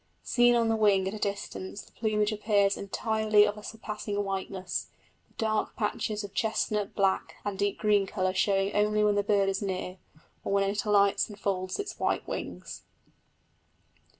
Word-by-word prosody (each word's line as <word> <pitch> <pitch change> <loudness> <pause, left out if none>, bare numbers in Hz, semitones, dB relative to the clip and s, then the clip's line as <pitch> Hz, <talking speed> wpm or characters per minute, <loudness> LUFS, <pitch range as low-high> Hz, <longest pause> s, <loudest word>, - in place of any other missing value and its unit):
Seen 240 -1 +4
on 230 -1 +3
the 225 - +2
wing 200 -3 +3
at 190 - -3
a 215 - -6
distance 200 -1 -4
the - - -20
plumage 215 -1 0
appears 205 -2 +2
entirely 215 +1 +2
of 205 0 -1
a 210 - -10
surpassing 210 -1 -4
whiteness, 190 -1 -3 0.4
the - - -31
dark 215 -1 -1
patches 210 -1 -2
of 200 -1 -8
chestnut, 215 -2 -1
black, 195 -1 +1
and 200 -2 -3
deep 205 0 0
green 205 -2 +2
colour 185 -1 -1
showing 195 0 +1
only 210 0 +2
when 210 0 +4
the 205 - +2
bird 200 -1 +2
is 195 +1 -1
near, 185 -1 -4 0.4
or - - -3
when 200 0 +3
it 205 +4 -1
alights 200 -1 +3
and 210 -1 -11
folds 185 -2 -2
its 405 0 -5
white - - 0
wings. - - -6
205 Hz, 175 wpm, -29 LUFS, 195-215 Hz, 0.4 s, Seen